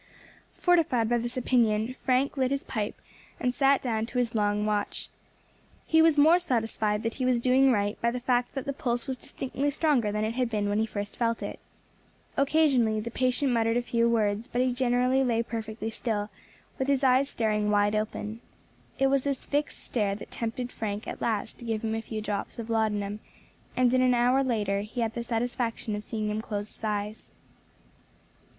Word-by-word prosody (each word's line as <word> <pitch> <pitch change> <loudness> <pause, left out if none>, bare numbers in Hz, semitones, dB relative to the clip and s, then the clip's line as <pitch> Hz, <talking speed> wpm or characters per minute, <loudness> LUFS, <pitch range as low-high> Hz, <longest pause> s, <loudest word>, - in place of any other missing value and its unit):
Fortified 320 - +3
by 240 0 +2
this 240 +2 -4
opinion, 235 -2 +2
Frank 260 +2 0
lit 260 -2 +1
his 275 0 -1
pipe, 210 -1 -3 0.4
and 250 0 0
sat 275 +1 +3
down 225 -3 -1
to 250 - -5
his 245 -2 +1
long 210 -1 +1
watch. 210 -1 -2 0.8
He 320 0 +4
was 325 -1 +5
the 290 - +6
more 335 +4 +6
satisfied 225 -8 -1
that 230 0 -1
he 260 - -2
was 250 -1 +3
doing 260 +2 +4
right 205 -3 0
by 235 - +3
the 250 +1 -3
fact 245 +1 0
that 270 - -3
the 280 - -2
pulse 240 -2 -1
was 265 -1 -3
distinctly 270 +2 -3
stronger 285 -7 +1
than 210 +1 -1
it 220 - -2
had 250 -1 0
been 210 -2 -1
when 205 +1 +1
he 220 - +1
first 205 -1 -5
felt 230 -1 0
it. - - -5 0.8
Occasionally 275 -7 +3
the 230 +2 -5
patient 255 +2 +1
muttered 230 0 +2
a - - +2
few 235 -1 +2
words, 215 0 +1
but 245 - -2
he 255 -1 +2
generally 250 +1 +2
lay 235 -2 +1
perfectly 225 -1 -5
still, 210 -2 -2 0.5
with 265 - 0
his 280 -1 +2
eyes 265 +1 +4
staring 210 -2 0
wide 205 0 +3
open. 215 +1 -3 0.6
It 270 - +2
was 270 0 +3
this 280 -1 -3
fixed 290 +1 -2
stare 205 -4 -1
that 205 - -10
tempted 240 +2 -3
Frank 210 -1 -4
at - - -6
last 220 -1 -2
to 240 - -9
give 225 -1 -2
him 220 -1 -1
a 225 - -1
few 220 -1 -5
drops 205 -1 -4
of 230 -1 -5
laudanum, 210 -2 0 0.6
and 250 -1 +4
in 255 - +4
an 250 -1 +4
hour 250 +3 +3
later 205 -6 0
he 220 +4 -4
had 225 -1 0
the 235 - -3
satisfaction 235 -2 -2
of 210 - -5
seeing 215 -1 -3
him 215 +1 -2
close 205 -1 -4
his - - -21
eyes. 210 0 -3
235 Hz, 200 wpm, -28 LUFS, 215-255 Hz, 0.8 s, the